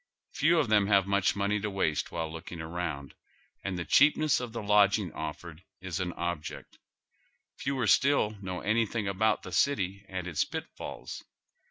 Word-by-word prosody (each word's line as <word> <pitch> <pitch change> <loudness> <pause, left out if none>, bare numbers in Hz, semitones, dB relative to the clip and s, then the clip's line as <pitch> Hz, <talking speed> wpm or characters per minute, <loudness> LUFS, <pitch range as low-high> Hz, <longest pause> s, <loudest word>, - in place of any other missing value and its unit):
Few 170 +2 +3
of 150 -6 +2
them 105 -2 +4
have 100 -2 +4
much 100 0 +2
money 100 +1 0
to 105 +1 -2
waste 95 -6 -1
while 80 -2 -3
looking 85 +1 -8
around, 80 -4 -4 0.5
and 95 -2 -3
the 85 - -3
cheapness 150 +1 +4
of 125 -2 -5
the 115 -1 -5
lodging 100 -2 +3
offered 80 +2 -6 0.2
is 95 -2 -4
an 90 -1 -2
object. 85 -3 -5 0.8
Fewer 135 -3 -1
still 110 +3 +4
know 90 -2 -4
anything 110 0 0
about 100 +3 +1
the 90 - -8
city 100 -2 +1
and 95 -2 -4
its 85 - +1
pitfalls. - - -7
100 Hz, 160 wpm, -29 LUFS, 85-110 Hz, 0.8 s, them